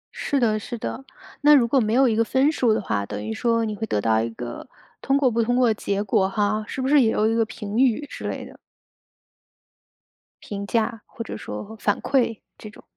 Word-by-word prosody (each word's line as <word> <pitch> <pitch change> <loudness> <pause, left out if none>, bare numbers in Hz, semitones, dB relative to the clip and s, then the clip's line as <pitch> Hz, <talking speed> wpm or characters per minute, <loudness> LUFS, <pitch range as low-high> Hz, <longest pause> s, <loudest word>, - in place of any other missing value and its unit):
是 280 - -1
的 220 -3 +2
是 235 +3 -6
的， 230 +3 -5 0.4
那 295 0 +7
如 245 -5 +4
果 270 +3 +3
没 220 -2 0
有 265 +1 +5
一 225 - +1
个 230 - +3
分 265 +5 +2
数 250 -7 +1
的 215 - +2
话， 100 - -2
等 105 +1 -6
于 110 - -3
说 230 - +1
你 215 -1 -3
会 220 - -3
得 105 - 0
到 110 +1 +2
一 115 - -2
个 120 - -8 0.3
通 270 +1 +2
过 275 -2 +3
不 230 +1 +1
通 240 +2 +1
过 250 -1 +4
的 225 - +3
结 200 -1 -2
果 195 -2 +1
哈。 210 +2 0
是 - - -6
不 260 - 0
是 290 0 +5
也 230 - +3
有 215 - +2
一 225 - +1
个 230 0 +2
评 215 0 -5
语 265 +2 +2
之 - - -7
类 - - -5
的？ - - -14 1.9
评 200 -1 -5
价 225 0 -1
或 230 - -8
者 - - -7
说 220 +2 -7
反 205 - +1
馈 245 -5 +1 0.2
这 215 - -10
种。 210 - -16
225 Hz, 250 characters per minute, -23 LUFS, 205-245 Hz, 1.9 s, 那